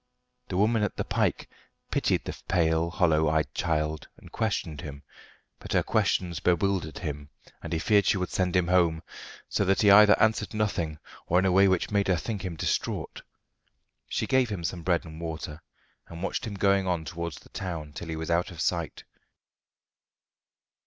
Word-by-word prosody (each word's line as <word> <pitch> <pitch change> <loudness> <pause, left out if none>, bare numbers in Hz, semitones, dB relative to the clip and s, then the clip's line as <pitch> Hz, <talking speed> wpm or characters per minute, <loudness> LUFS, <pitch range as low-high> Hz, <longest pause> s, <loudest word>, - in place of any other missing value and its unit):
The 90 - -3
woman 110 +3 +3
at 105 - -1
the - - -2
'pike - - -1 0.4
pitied - - +1
the - - -5
pale, 85 -2 +2
hollow 80 -3 +2
eyed 80 0 0
child, 75 -1 -1
and - - -15
questioned 90 -8 -2
him; 70 -1 -8 0.6
but - - -6
her - - +3
questions 85 -2 0
bewildered 90 -3 0
him, 75 -3 -5 0.3
and 85 - -7
he 85 - 0
feared 100 +3 +3
she - - +3
would 90 -1 -3
send 90 -1 0
him 90 -1 +2
home, 85 -3 +2 0.4
so - - 0
that 95 +2 +2
he 100 - +7
either 105 +1 +8
answered 110 -1 +1
nothing, 85 -7 -1 0.3
or 90 - +2
in 95 - +3
a 95 - +3
way 95 +2 +5
which 95 +1 +1
made 100 -1 +1
her 95 - +3
think 105 +2 -4
him 90 -3 -4
distraught. - - -2 0.9
She - - -1
gave 130 -2 +2
him 100 -5 -4
some 85 +1 -3
bread 85 0 0
and 80 0 -10
water, 80 -1 -6 0.5
and 85 +1 -8
watched - - -2
him 105 - -5
going 100 -1 +2
on 85 -3 -1
towards 85 -1 -5
the - - -16
town 80 -5 -5
till 85 - -7
he 80 - -4
was 80 +1 -4
out 85 +1 +1
of 85 -3 -11
sight. - - -2
90 Hz, 185 wpm, -27 LUFS, 80-100 Hz, 0.9 s, either